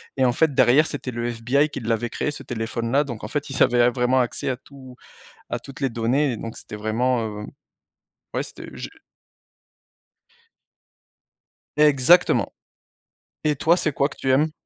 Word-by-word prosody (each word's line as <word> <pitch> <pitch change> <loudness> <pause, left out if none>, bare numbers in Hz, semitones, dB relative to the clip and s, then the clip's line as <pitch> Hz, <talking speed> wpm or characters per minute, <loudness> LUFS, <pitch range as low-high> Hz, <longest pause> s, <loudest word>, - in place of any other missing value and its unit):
et 130 - +1
en 125 - +4
fait 155 +3 +2
derrière 140 +5 +5
c'était 135 -3 -5
le 120 0 -3
FBI 120 +5 +1
qui 140 - -7
l'avait 115 +1 -1
créé 150 - -2
ce 145 - -7
téléphone 115 0 -4
là 145 +2 +4
donc 120 -7 -7
en - - -4
fait 145 +5 -3
ils 135 - -3
avaient 120 -1 +5
vraiment 125 +1 +2
accès 120 - -2
à 130 - 0
tout 130 -1 -14 0.5
à - - -2
toutes 140 - -12
les 135 -2 0
données 125 +4 +1
et 115 - -5
donc 115 +1 -7
c'était - - -8
vraiment 115 +3 0
heu 105 -1 -6 0.9
Ouais, - - -1
c'était - - -9
je - - -7 2.9
Exactement. 150 +4 +5 0.9
Et 150 -1 +2
toi, 165 +5 +4
c'est 160 -4 0
quoi 140 0 +1
que - - -13
tu 130 - 0
aimes? 150 +4 +3
130 Hz, 170 wpm, -23 LUFS, 120-140 Hz, 2.9 s, derrière